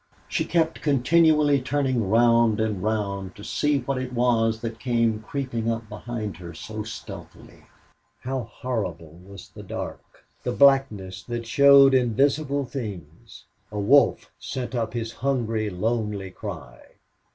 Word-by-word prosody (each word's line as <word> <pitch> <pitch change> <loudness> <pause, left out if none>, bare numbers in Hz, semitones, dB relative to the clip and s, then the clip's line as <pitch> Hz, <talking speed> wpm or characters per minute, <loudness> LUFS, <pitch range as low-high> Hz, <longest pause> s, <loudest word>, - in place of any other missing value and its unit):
She - - -1
kept 165 -1 0
continually 150 0 +3
turning 130 -6 0
round 115 -1 +4
and 110 -4 -1
round 100 -2 -2
to 105 - -11
see 150 +5 +1
what 130 +1 -2
it 130 -1 -5
was 115 -2 +1
that 115 -1 -5
came 115 -3 +1
creeping 115 -2 -3
up 115 -1 -3
behind 105 -3 -5
her 85 -2 -10
so 110 +5 -6
stealthily. 110 0 -10 0.6
How 130 -2 -3
horrible 90 -10 -5
was 100 -1 -12
the - - -11
dark - - -8 0.2
the 125 - -2
blackness 115 -10 +3
that 120 -1 -4
showed 140 +2 +6
invisible 135 +3 +1
things! 105 - -8 0.3
A 105 - -5
wolf 135 +8 +3
sent 130 -1 -5
up 115 -2 -2
his 115 -1 -3
hungry, 115 -5 -1
lonely 105 -1 -2
cry. 80 -13 -8
115 Hz, 135 wpm, -24 LUFS, 105-135 Hz, 0.6 s, showed